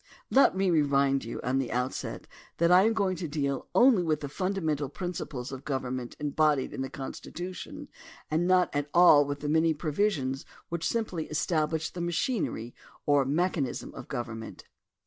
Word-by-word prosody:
Let 270 Hz, -8 st, +5 dB
me 190 Hz, -1 st, +2 dB
remind 140 Hz, -3 st, +3 dB
you 115 Hz, -, -5 dB
at 130 Hz, +2 st, 0 dB
the 130 Hz, -3 st, -2 dB
outset 125 Hz, +2 st, -3 dB, 0.3 s
that 170 Hz, +1 st, +3 dB
I 185 Hz, +2 st, +7 dB
am 225 Hz, -, +2 dB
going 195 Hz, -4 st, +1 dB
to 170 Hz, -, -4 dB
deal 140 Hz, -2 st, -2 dB
only 245 Hz, -6 st, +6 dB
with 160 Hz, -3 st, 0 dB
the 145 Hz, -, -4 dB
fundamental 160 Hz, -5 st, -1 dB
principles 145 Hz, -6 st, -5 dB
of 135 Hz, 0 st, -7 dB
govern 130 Hz, -3 st, -2 dB
ment 120 Hz, -1 st, -7 dB
embodied 150 Hz, -1 st, +1 dB
in -, -, -4 dB
the 135 Hz, -, -3 dB
Constitution 185 Hz, -, -7 dB, 0.4 s
and 165 Hz, +3 st, +1 dB
not 185 Hz, -1 st, +4 dB
at 145 Hz, 0 st, -1 dB
all 170 Hz, -5 st, +7 dB
with 145 Hz, 0 st, -4 dB
the 150 Hz, -, -3 dB
many 160 Hz, +1 st, +3 dB
provisions 150 Hz, -4 st, -1 dB, 0.3 s
which 170 Hz, -1 st, -2 dB
simply 200 Hz, -9 st, -2 dB
establish 155 Hz, 0 st, 0 dB
the 180 Hz, -, -7 dB
machineiy 170 Hz, -, -1 dB, 0.3 s
or 145 Hz, -2 st, +4 dB
mechanism 150 Hz, -2 st, -1 dB
of -, -, -9 dB
government. 115 Hz, -3 st, -6 dB
155 Hz, 165 wpm, -28 LUFS, 135-180 Hz, 0.4 s, I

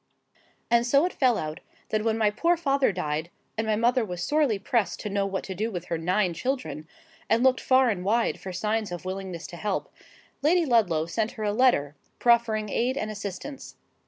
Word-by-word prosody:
And 235 Hz, 0 st, +5 dB
so 280 Hz, +6 st, +4 dB
it 365 Hz, -, -2 dB
fell 250 Hz, -4 st, +3 dB
out, 155 Hz, 0 st, -4 dB, 0.3 s
that 215 Hz, -1 st, 0 dB
when 225 Hz, 0 st, +1 dB
my 215 Hz, -2 st, +3 dB
poor 340 Hz, +11 st, +2 dB
father 275 Hz, -6 st, +2 dB
died, 160 Hz, -3 st, -3 dB, 0.3 s
and 220 Hz, 0 st, -2 dB
my 215 Hz, -, +2 dB
mother 240 Hz, +3 st, +2 dB
was 180 Hz, -4 st, -4 dB
sorely 295 Hz, -6 st, +2 dB
pressed 215 Hz, +1 st, 0 dB
to 210 Hz, -, -4 dB
know 200 Hz, 0 st, 0 dB
what 190 Hz, -1 st, -3 dB
to 190 Hz, -, -5 dB
do 215 Hz, +5 st, -2 dB
with 180 Hz, -5 st, -5 dB
her 170 Hz, -, 0 dB
nine 180 Hz, +2 st, +1 dB
children, 250 Hz, -, -3 dB, 0.4 s
and 230 Hz, +2 st, +3 dB
looked 260 Hz, -1 st, +4 dB
far 260 Hz, 0 st, +4 dB
and 180 Hz, -4 st, -3 dB
wide 225 Hz, +4 st, +1 dB
for 190 Hz, -, -7 dB
signs 215 Hz, +2 st, -1 dB
of 175 Hz, 0 st, -6 dB
willingness 185 Hz, -2 st, -5 dB
to 175 Hz, -, -9 dB
help, 205 Hz, +1 st, -3 dB, 0.5 s
Lady 335 Hz, +4 st, +3 dB
Ludlow 195 Hz, -, +2 dB
sent 215 Hz, +6 st, -2 dB
her 220 Hz, -, -6 dB
a 205 Hz, -1 st, 0 dB
letter, 205 Hz, -, +3 dB, 0.2 s
proffering 230 Hz, -3 st, +2 dB
aid 255 Hz, +3 st, 0 dB
and 215 Hz, -5 st, -2 dB
assistance. 205 Hz, +7 st, -7 dB
215 Hz, 200 wpm, -26 LUFS, 185-245 Hz, 0.5 s, And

